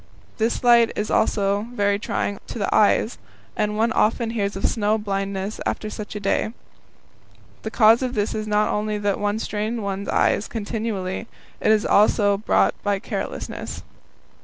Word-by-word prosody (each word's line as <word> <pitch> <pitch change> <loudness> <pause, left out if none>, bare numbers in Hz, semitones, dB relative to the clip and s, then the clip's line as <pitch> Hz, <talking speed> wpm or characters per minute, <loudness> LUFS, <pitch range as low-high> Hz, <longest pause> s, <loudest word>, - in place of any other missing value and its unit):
This 225 +3 0
light 235 -1 +6
is 210 - -2
also 205 0 +1
very 205 -2 +1
trying 205 -1 -2
to - - -6
the 200 - -1
eyes, 215 +2 +3 0.4
and 210 -1 -1
one 225 +1 +2
often 225 +1 +1
hears 205 -3 -2
of 195 - -2
snow 215 -1 +1
blindness 195 -1 -3
after 215 - -3
such 210 0 -7
a - - -3
day. 205 +2 0 1.1
The 220 - -4
cause 225 +1 +5
of 255 -1 -2
this 205 0 0
is 215 0 -3
not 210 0 +2
only 210 0 -1
that 205 -1 -1
one 205 +1 0
strains 220 +1 -3
one's 200 -1 -4
eyes 205 - +2
continually; 215 -2 -3 0.3
it - - +3
is 215 -1 +3
also 205 -1 +4
brought 215 - +3
about - - -33
by 205 -1 +1
carelessness. - - -5
210 Hz, 165 wpm, -23 LUFS, 200-220 Hz, 1.1 s, light